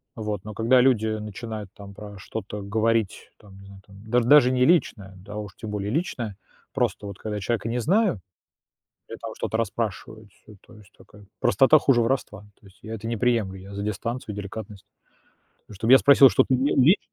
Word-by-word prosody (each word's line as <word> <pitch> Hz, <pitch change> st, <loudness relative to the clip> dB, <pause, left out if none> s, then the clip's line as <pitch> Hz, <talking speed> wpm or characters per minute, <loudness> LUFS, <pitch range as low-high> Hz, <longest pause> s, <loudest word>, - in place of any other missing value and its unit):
Вот. 105 Hz, -4 st, -4 dB
Но 110 Hz, -, -8 dB
когда 115 Hz, +5 st, +3 dB
люди 125 Hz, -4 st, +2 dB
начинают 110 Hz, -1 st, -6 dB
там 100 Hz, -1 st, -12 dB
про 100 Hz, 0 st, -11 dB
что-то 105 Hz, +1 st, -7 dB
говорить, 110 Hz, +1 st, -1 dB
там, 100 Hz, -2 st, -18 dB
не 100 Hz, -, -14 dB
знаю, 100 Hz, 0 st, -14 dB
там 100 Hz, +1 st, -16 dB
даж 120 Hz, 0 st, +2 dB
даже 130 Hz, -1 st, +6 dB
не 125 Hz, 0 st, +2 dB
личное, 110 Hz, -, +1 dB
да, 100 Hz, +3 st, -12 dB
а 105 Hz, -, -6 dB
уж 105 Hz, -2 st, -7 dB
тем 110 Hz, -, -8 dB
более 105 Hz, 0 st, -3 dB
личное, 120 Hz, -, -3 dB, 0.4 s
просто 105 Hz, -, -1 dB
вот 100 Hz, -2 st, -8 dB
когда 105 Hz, -1 st, -5 dB
человека 115 Hz, +2 st, -2 dB
не 120 Hz, +2 st, -2 dB
знаю, 185 Hz, -, +1 dB, 0.9 s
и -, -, -6 dB
там -, -, -7 dB
что-то 110 Hz, -, -3 dB
расспрашивают 110 Hz, -1 st, -4 dB
всё: 105 Hz, -, -18 dB
то -, -, -19 dB
есть 105 Hz, -2 st, -19 dB
такая 105 Hz, 0 st, -18 dB
простота- 135 Hz, +5 st, +5 dB
хуже 130 Hz, -4 st, +3 dB
воровства. 115 Hz, -3 st, -2 dB, 0.2 s
То -, -, -23 dB
есть 95 Hz, -, -21 dB
я 110 Hz, -, -8 dB
это 115 Hz, 0 st, -6 dB
не 115 Hz, -, -2 dB
приемлю, 110 Hz, -5 st, 0 dB
я 100 Hz, +2 st, -12 dB
за 100 Hz, -, -5 dB
дистанцию, 105 Hz, +2 st, -4 dB
деликатность. 100 Hz, 0 st, -8 dB, 0.8 s
То -, -, -12 dB
чтоб 110 Hz, +5 st, -2 dB
я 135 Hz, -, +9 dB
спросил, 140 Hz, -1 st, +7 dB
что -, -, +3 dB
ты 130 Hz, -, +2 dB
е 135 Hz, +3 st, +1 dB
лич 150 Hz, +10 st, +5 dB
110 Hz, 205 wpm, -24 LUFS, 100-120 Hz, 0.9 s, я